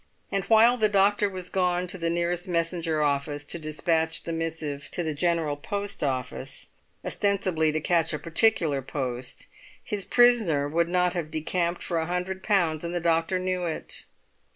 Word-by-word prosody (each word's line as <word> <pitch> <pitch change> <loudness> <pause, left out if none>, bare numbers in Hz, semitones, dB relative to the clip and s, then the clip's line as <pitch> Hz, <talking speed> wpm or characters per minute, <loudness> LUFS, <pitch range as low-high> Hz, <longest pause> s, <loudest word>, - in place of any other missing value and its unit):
And 195 -1 0
while 230 +2 +6
the 215 -2 +3
doctor 205 +1 +3
was 185 -2 -7
gone 180 -1 +1
to 185 +1 -4
the 165 0 0
nearest 175 +2 -1
messenger 165 -2 0
office 145 0 -1
to 170 - -4
despatch 160 +1 0
the 165 - -4
missive 160 -3 -4
to 175 - -1
the 160 -1 -2
General 165 -1 +1
Post 200 +7 -4
Office, 130 0 -3 0.4
ostensibly 185 -6 +1
to 155 - -1
catch 165 0 +2
a 155 - -1
particular 165 -3 +2
post, 125 -2 -4 0.4
his 205 -2 -3
prisoner 220 - +4
would 170 +3 +1
not 180 0 +2
have 170 -4 -3
decamped 170 +3 -1
for 170 -2 -1
a 160 - -2
hundred 180 +2 -3
pounds, 175 -7 +1
and 170 +1 -3
the - - +1
doctor 165 +2 +1
knew 185 -1 -1
it. 160 -2 -5
170 Hz, 170 wpm, -26 LUFS, 155-185 Hz, 0.4 s, while